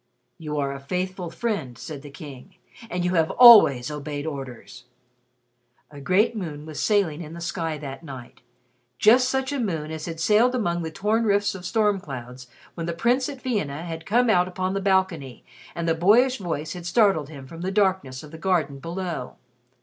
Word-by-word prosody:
"You 150 Hz, -2 st, -4 dB
are 140 Hz, -1 st, -1 dB
a 140 Hz, -, -7 dB
faithful 180 Hz, +4 st, -4 dB
friend," 165 Hz, -, -3 dB
said 150 Hz, -3 st, -8 dB
the 145 Hz, -, -11 dB
King, 140 Hz, -2 st, -11 dB, 0.3 s
"and 180 Hz, 0 st, -2 dB
you 180 Hz, -, +1 dB
have 165 Hz, -2 st, +2 dB
always 180 Hz, -, +8 dB
obeyed 145 Hz, 0 st, -5 dB
orders!" 130 Hz, -4 st, -8 dB, 1.1 s
A 145 Hz, -1 st, -11 dB
great 195 Hz, +10 st, +2 dB
moon 155 Hz, -7 st, -6 dB
was 155 Hz, -2 st, -7 dB
sailing 195 Hz, -7 st, +1 dB
in 155 Hz, -1 st, -8 dB
the 170 Hz, -, -8 dB
sky 165 Hz, -2 st, -3 dB
that 140 Hz, 0 st, -8 dB
night 130 Hz, -6 st, -10 dB, 0.6 s
just 250 Hz, +4 st, +5 dB
such 265 Hz, +1 st, -1 dB
a 285 Hz, -, -2 dB
moon 165 Hz, -9 st, -2 dB
as 160 Hz, -1 st, -5 dB
had 165 Hz, -1 st, -6 dB
sailed 220 Hz, +8 st, +3 dB
among 175 Hz, -8 st, -1 dB
the 160 Hz, -, -4 dB
torn 215 Hz, +7 st, 0 dB
rifts 205 Hz, -1 st, +2 dB
of 180 Hz, -2 st, -7 dB
storm 210 Hz, -3 st, +2 dB
clouds 125 Hz, -5 st, -9 dB, 0.3 s
when 165 Hz, -1 st, -5 dB
the 170 Hz, -, -2 dB
Prince 245 Hz, +8 st, +1 dB
at 275 Hz, -3 st, -9 dB
Vienna 165 Hz, -, -2 dB
had 165 Hz, -1 st, -7 dB
come 240 Hz, +4 st, +3 dB
out 180 Hz, -5 st, +3 dB
upon 185 Hz, +1 st, -3 dB
the 195 Hz, -, -2 dB
balcony 185 Hz, -, 0 dB, 0.3 s
and 170 Hz, -1 st, -3 dB
the 165 Hz, -, +3 dB
boyish 225 Hz, +10 st, +4 dB
voice 160 Hz, -4 st, -4 dB
had 175 Hz, -1 st, -7 dB
startled 170 Hz, -6 st, +2 dB
him 140 Hz, -4 st, -10 dB
from 165 Hz, +5 st, -10 dB
the 185 Hz, -, -2 dB
darkness 190 Hz, -10 st, 0 dB
of 150 Hz, -, -12 dB
the 160 Hz, -, -10 dB
garden 165 Hz, -7 st, 0 dB
below. 170 Hz, -4 st, -5 dB
170 Hz, 190 wpm, -24 LUFS, 150-200 Hz, 1.1 s, always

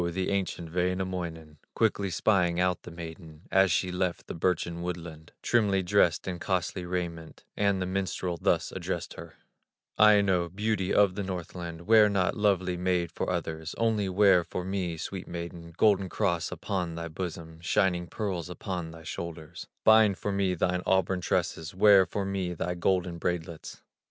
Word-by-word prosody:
the 95 Hz, +1 st, -1 dB
ancient 90 Hz, -4 st, -2 dB
Wainamoinen, 90 Hz, -4 st, -2 dB, 0.2 s
Quickly 100 Hz, -3 st, +1 dB
spying 90 Hz, -2 st, +2 dB
out 90 Hz, -1 st, +1 dB
the -, -, -10 dB
maiden, 80 Hz, -1 st, -10 dB
As 95 Hz, -1 st, +4 dB
she 90 Hz, +2 st, +1 dB
left 90 Hz, -1 st, -2 dB
the -, -, -6 dB
birchen 85 Hz, 0 st, -1 dB
woodland, 85 Hz, -2 st, -6 dB
Trimly 100 Hz, -5 st, +2 dB
dressed 90 Hz, -3 st, +2 dB
in 90 Hz, -2 st, -3 dB
costly 90 Hz, 0 st, -2 dB
raiment, 85 Hz, -3 st, -4 dB
And 100 Hz, -2 st, +1 dB
the 90 Hz, -, -1 dB
minstrel 90 Hz, -2 st, -2 dB
thus -, -, +1 dB
addressed -, -, -4 dB
her: -, -, -11 dB, 0.6 s
"Aino, 100 Hz, -5 st, +5 dB
beauty 100 Hz, 0 st, -1 dB
of 100 Hz, -3 st, +4 dB
the 100 Hz, -, -4 dB
Northland, 90 Hz, -3 st, -5 dB
Wear 105 Hz, +2 st, +6 dB
not, 95 Hz, -3 st, +1 dB
lovely 95 Hz, -4 st, +1 dB
maid, 90 Hz, -2 st, 0 dB
for -, -, -3 dB
others, 80 Hz, -2 st, -3 dB
Only 110 Hz, -4 st, +1 dB
wear 95 Hz, -2 st, +5 dB
for 90 Hz, +1 st, -5 dB
me, 95 Hz, -3 st, -2 dB
sweet 90 Hz, +3 st, -6 dB
maiden, 85 Hz, -1 st, -7 dB
Golden 100 Hz, -3 st, +3 dB
cross 85 Hz, -6 st, 0 dB
upon 90 Hz, -1 st, -3 dB
thy 85 Hz, 0 st, -4 dB
bosom, 80 Hz, -1 st, -6 dB
Shining 90 Hz, +1 st, +1 dB
pearls 90 Hz, -4 st, -3 dB
upon 90 Hz, -2 st, -5 dB
thy 80 Hz, 0 st, -11 dB
shoulders; 80 Hz, -1 st, -7 dB, 0.2 s
Bind 110 Hz, -3 st, +6 dB
for 100 Hz, -, -3 dB
me 100 Hz, -2 st, +1 dB
thine 90 Hz, +1 st, 0 dB
auburn 95 Hz, -1 st, +2 dB
tresses, 80 Hz, 0 st, -1 dB
Wear 95 Hz, -1 st, +6 dB
for 100 Hz, +4 st, -3 dB
me 95 Hz, -2 st, -2 dB
thy 90 Hz, +2 st, -2 dB
golden 90 Hz, -1 st, 0 dB
braidlets." 85 Hz, -2 st, -4 dB
90 Hz, 160 wpm, -28 LUFS, 85-95 Hz, 0.6 s, Wear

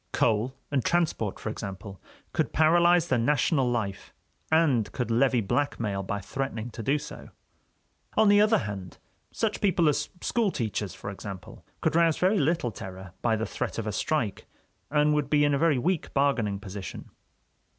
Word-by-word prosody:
Coal 115 Hz, +4 st, +1 dB, 0.2 s
and 135 Hz, -4 st, +1 dB
transport, 160 Hz, -, 0 dB
for -, -, -5 dB
example, 100 Hz, -2 st, -7 dB, 0.3 s
could -, -, -1 dB
paralyze 170 Hz, +2 st, +4 dB
the 125 Hz, -, +2 dB
national 135 Hz, +1 st, +2 dB
life, 110 Hz, -5 st, -3 dB, 0.4 s
and 145 Hz, -9 st, +3 dB
could 125 Hz, -3 st, -2 dB
levy 125 Hz, +1 st, +3 dB
blackmail 105 Hz, -3 st, -1 dB
by 100 Hz, +1 st, -3 dB
threatening 120 Hz, +1 st, -4 dB
to 115 Hz, -, -7 dB
do 135 Hz, +7 st, +1 dB
so. -, -, -9 dB, 0.9 s
On 220 Hz, 0 st, +5 dB
the 205 Hz, 0 st, +6 dB
other 215 Hz, +1 st, +4 dB
hand, 100 Hz, -, -6 dB, 0.3 s
such 220 Hz, -2 st, -2 dB
people 180 Hz, -5 st, +3 dB
as 150 Hz, -, +1 dB
school 230 Hz, -4 st, +1 dB
teachers, 110 Hz, -, -3 dB
for 100 Hz, -, -6 dB
example, 95 Hz, -1 st, -9 dB, 0.2 s
could -, -, +1 dB
rouse 165 Hz, -2 st, +4 dB
very 190 Hz, +3 st, +3 dB
little 145 Hz, -4 st, +1 dB
terror 95 Hz, -2 st, -9 dB
by 115 Hz, -2 st, +2 dB
the 110 Hz, 0 st, -2 dB
threat -, -, -4 dB
of 115 Hz, -, -3 dB
a 105 Hz, -, -2 dB
strike 120 Hz, -, -2 dB, 0.4 s
and 150 Hz, 0 st, +3 dB
would 150 Hz, -2 st, 0 dB
be 145 Hz, -1 st, +4 dB
in 145 Hz, -, +2 dB
a 140 Hz, -, +1 dB
very 160 Hz, -4 st, +3 dB
weak 170 Hz, +6 st, -1 dB
bargaining 125 Hz, -8 st, +1 dB
position. 100 Hz, -3 st, -8 dB
130 Hz, 170 wpm, -27 LUFS, 105-160 Hz, 0.9 s, the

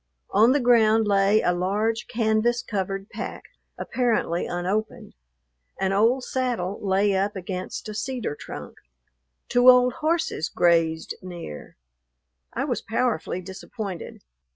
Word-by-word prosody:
On 220 Hz, +5 st, +5 dB
the 285 Hz, -, +3 dB
ground 225 Hz, -3 st, +4 dB
lay 200 Hz, +1 st, +4 dB
a 180 Hz, -, +2 dB
large 210 Hz, +6 st, -1 dB
canvas 225 Hz, +1 st, +1 dB
covered 195 Hz, -1 st, -3 dB
pack, -, -, -6 dB, 0.3 s
apparently 230 Hz, -8 st, 0 dB
unopened. 190 Hz, +5 st, -3 dB, 0.7 s
An 190 Hz, 0 st, +1 dB
old 230 Hz, +6 st, +3 dB
saddle 240 Hz, -9 st, -2 dB
lay 195 Hz, 0 st, +2 dB
up 200 Hz, +2 st, 0 dB
against 185 Hz, +2 st, -5 dB
a 215 Hz, -, -5 dB
cedar 235 Hz, -, -3 dB
trunk. -, -, -9 dB, 0.7 s
Two 245 Hz, +1 st, +5 dB
old 250 Hz, 0 st, +6 dB
horses 315 Hz, -, -1 dB
grazed 165 Hz, -2 st, +2 dB
near. 175 Hz, -, -9 dB, 0.8 s
I -, -, -2 dB
was -, -, -2 dB
powerfully 225 Hz, -6 st, -1 dB
disappointed. 190 Hz, 0 st, -7 dB
210 Hz, 120 wpm, -24 LUFS, 185-240 Hz, 0.8 s, old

